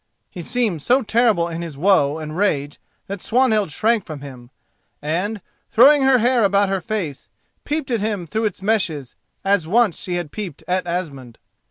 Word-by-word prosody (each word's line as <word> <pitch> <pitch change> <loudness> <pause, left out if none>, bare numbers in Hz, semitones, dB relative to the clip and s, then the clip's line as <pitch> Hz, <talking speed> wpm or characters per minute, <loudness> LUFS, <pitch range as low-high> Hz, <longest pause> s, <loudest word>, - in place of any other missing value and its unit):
He 180 - -7
seemed 210 -4 -1
so 255 - +2
terrible 220 -6 +2
in 170 0 -5
his 165 -5 -7
woe 155 -4 +3
and 155 -1 -6
rage 145 -7 -1 0.3
that 200 -1 -6
Swanhild 225 -5 +2
shrank 220 +7 +1
from 155 -6 -8
him, 125 -4 -11 0.5
and, 185 +8 -2 0.3
throwing 275 +5 +6
her 265 -1 +5
hair 245 0 +2
about 200 0 +3
her 195 -1 -1
face, 170 -7 -4 0.4
peeped 295 -2 -2
at 230 - +1
him 205 -4 -2
through 220 +8 -2
its 195 -2 -3
meshes 170 - -1 0.3
as 195 -5 +2
once 220 -1 +2
she 180 - -4
had 175 -4 -4
peeped 195 -9 -7
at 180 0 -1
Asmund. 140 -9 -5
190 Hz, 175 wpm, -21 LUFS, 160-220 Hz, 0.5 s, throwing